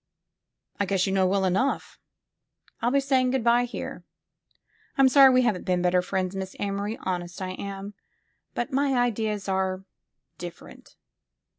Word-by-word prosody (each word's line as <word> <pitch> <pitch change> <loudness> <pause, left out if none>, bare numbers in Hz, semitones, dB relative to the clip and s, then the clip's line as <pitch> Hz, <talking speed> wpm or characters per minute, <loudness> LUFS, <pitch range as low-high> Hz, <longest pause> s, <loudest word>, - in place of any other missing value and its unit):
'*I 200 - +1
guess 190 -1 +1
you 190 - -1
know 190 -1 +3
well 195 +1 +1
enough. 195 +10 -1 0.8
I'll 235 - +2
be 280 +2 +3
saying 265 -2 +2
good 260 -2 0
by 240 +1 +4
here. 245 - -7 0.9
I'm 270 -1 +6
sorry 270 0 +8
we 255 0 +4
haven't 215 -7 0
been 180 -1 0
better 180 0 +3
friends, 185 0 -2
Miss 190 0 -5
Amory, 200 +2 -2
honest 175 -1 -3
I 185 -1 -4
am. 195 +1 -6 0.6
But 240 - -3
my 275 0 +2
ideas 220 -4 0
are 190 0 -1 0.6
different." 175 -1 -10
200 Hz, 150 wpm, -26 LUFS, 185-245 Hz, 0.9 s, sorry